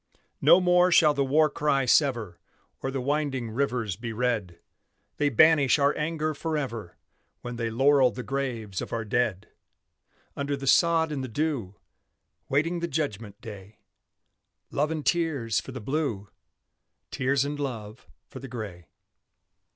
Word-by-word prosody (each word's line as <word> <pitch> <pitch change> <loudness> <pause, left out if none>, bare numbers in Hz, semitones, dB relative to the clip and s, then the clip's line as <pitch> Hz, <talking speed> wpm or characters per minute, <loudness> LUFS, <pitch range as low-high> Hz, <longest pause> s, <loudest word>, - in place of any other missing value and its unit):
No 180 - +7
more 180 0 +4
shall 155 -3 +6
the 140 -1 +1
war 150 +4 +3
cry 140 -2 0
sever, 120 - +2 0.4
Or 135 - -2
the 135 0 -3
winding 135 -3 -1
rivers 120 -5 -1
be 115 +3 -6
red; 110 -6 -2 0.6
They 145 -1 +2
banish 145 +1 +5
our 140 0 +2
anger 155 0 -2
forever 140 - -4 0.5
When 120 0 -6
they 115 -1 -2
laurel 135 +3 +4
the 125 +2 -7
graves 115 -7 -3
of - - -7
our 115 -1 -3
dead! 105 -3 -1 0.9
Under 140 0 -2
the 135 - -7
sod 165 +2 +3
and 140 -3 -3
the - - -4
dew, 120 -6 -2 0.7
Waiting 165 +5 +1
the 170 - -2
judgment 115 -10 -4
day; 105 -1 -10 0.9
Love 150 +2 0
and 155 -2 -4
tears 150 -10 +1
for - - -9
the 130 - -6
Blue, 120 -5 -2 0.8
Tears 135 +1 +1
and 145 +1 -4
love 115 -5 -6 0.2
for - - -10
the 135 - -8
Gray. 100 - -7
135 Hz, 145 wpm, -27 LUFS, 115-150 Hz, 0.9 s, No